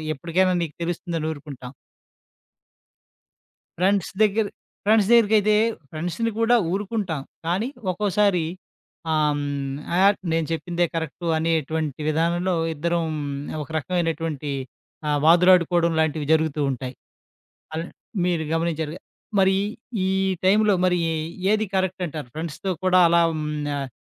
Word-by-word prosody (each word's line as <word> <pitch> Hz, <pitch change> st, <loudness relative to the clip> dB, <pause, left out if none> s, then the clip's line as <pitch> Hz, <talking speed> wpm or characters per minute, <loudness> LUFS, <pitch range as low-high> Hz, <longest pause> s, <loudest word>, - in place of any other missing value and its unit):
ఎప్పటికైనా 180 Hz, +5 st, +1 dB
నీకు 155 Hz, -3 st, -6 dB
తెలుస్తుందని 170 Hz, -2 st, -3 dB
ఊరుకుంటాం. 140 Hz, -4 st, -9 dB, 2.1 s
ఫ్రెండ్స్ 190 Hz, 0 st, +2 dB
దగ్గర 215 Hz, +1 st, +3 dB, 0.4 s
ఫ్రెండ్స్ 215 Hz, -2 st, +4 dB
దగ్గరికైతే 215 Hz, -2 st, +5 dB, 0.4 s
ఫ్రెండ్స్‌ని 175 Hz, +8 st, -2 dB
కూడా 230 Hz, +1 st, +4 dB, 0.2 s
ఊరుకుంటాం. 195 Hz, -5 st, -2 dB, 0.3 s
కానీ 190 Hz, +9 st, 0 dB, 0.2 s
ఒక్కోసారి 200 Hz, -2 st, +1 dB, 0.7 s
ఆహ్, 150 Hz, -1 st, +2 dB
హ్మ్, 140 Hz, -1 st, -3 dB, 0.2 s
ఆహ్, 200 Hz, +2 st, +5 dB, 0.2 s
నేను 165 Hz, -1 st, +1 dB
చెప్పిందే 175 Hz, +1 st, -1 dB
కరెక్టు 165 Hz, +1 st, -4 dB
అనేటువంటి 160 Hz, -2 st, -1 dB
విధానంలో 170 Hz, +4 st, +1 dB, 0.2 s
ఇద్దరం 170 Hz, +2 st, 0 dB, 0.6 s
ఒక -, -, -9 dB
రకమైనటువంటి 165 Hz, -3 st, -2 dB, 0.6 s
ఆహ్, 145 Hz, -1 st, +1 dB
వాదులాడుకోవడం 175 Hz, 0 st, +5 dB
లాంటివి 155 Hz, -1 st, 0 dB
జరుగుతూ 160 Hz, -1 st, +2 dB
ఉంటాయి. 130 Hz, 0 st, -4 dB, 0.8 s
అల్ 165 Hz, -, -2 dB, 0.4 s
మీరు 170 Hz, -3 st, 0 dB
గమనించారుగా. 165 Hz, 0 st, -2 dB, 0.4 s
మరి 190 Hz, 0 st, +4 dB, 0.5 s
ఈ -, -, +1 dB, 0.3 s
టైంలో 205 Hz, +1 st, +4 dB
మరి 180 Hz, -1 st, +3 dB, 0.5 s
ఏది 215 Hz, 0 st, +2 dB
కరెక్ట్ 185 Hz, -1 st, 0 dB
అంటారు? 150 Hz, -4 st, -6 dB
ఫ్రెండ్స్‌తో 165 Hz, +4 st, -4 dB
కూడా 185 Hz, 0 st, +5 dB
అలా 170 Hz, 0 st, +4 dB
హ్మ్, 155 Hz, -1 st, -3 dB, 0.3 s
ఆహ్, 135 Hz, -1 st, -4 dB
170 Hz, 110 wpm, -23 LUFS, 155-190 Hz, 2.1 s, దగ్గరికైతే